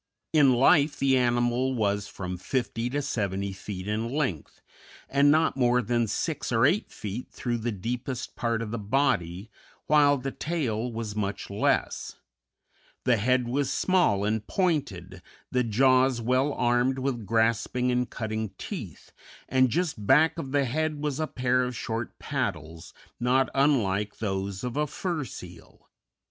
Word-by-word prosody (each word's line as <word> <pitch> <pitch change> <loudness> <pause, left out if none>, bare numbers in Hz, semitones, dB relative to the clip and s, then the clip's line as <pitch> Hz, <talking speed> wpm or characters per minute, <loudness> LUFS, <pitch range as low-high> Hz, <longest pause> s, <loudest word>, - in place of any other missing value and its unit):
In 140 -5 +5
life, 145 +3 +4
the 135 0 +3
animal 120 +1 +1
was 100 -3 0
from 90 -2 -5
fifty 120 +4 -2
to 145 +3 -2
seventy 100 -4 -2
feet 95 0 -7
in 110 +2 -1
length, 130 - -3 0.5
and 140 +1 +4
not 160 +2 +3
more 125 -2 +3
than 120 0 0
six 150 +8 -2
or 115 +1 +4
eight 185 +9 +1
feet 105 +4 -6
through 120 -1 -3
the 120 +2 -2
deepest 120 +5 -4
part 115 -1 -1
of 105 - -6
the 115 - -3
body, 100 -4 0 0.3
while 145 -1 +5
the 135 +1 -4
tail 125 -9 -2
was 110 -2 -5
much 100 -1 -3
less; 100 - 0 0.9
the 125 -2 +3
head 125 +3 +1
was 135 +2 0
small 175 - +2
and 110 0 -1
pointed, 155 - -1 0.3
the 125 0 +2
jaws 130 +2 +3
well 130 +5 +1
armed 125 +1 +1
with 130 -5 -3
grasping 115 +3 +1
and 125 0 0
cutting 110 -2 -3
teeth, - - -7 0.4
and 130 0 +3
just 150 - -2
back 155 +5 +4
of 135 -4 -5
the 140 -1 +2
head 155 +4 -1
was 150 -1 -2
a 155 - 0
pair 125 -1 +1
of 125 0 -3
short 115 0 -4
paddles, 80 +1 -4 0.3
not 130 +2 +2
unlike 105 -8 +1
those 95 -2 -3
of 125 -1 -3
a 150 0 +1
fur 170 +1 -3
seal. 90 -8 -12
125 Hz, 155 wpm, -27 LUFS, 110-135 Hz, 0.9 s, In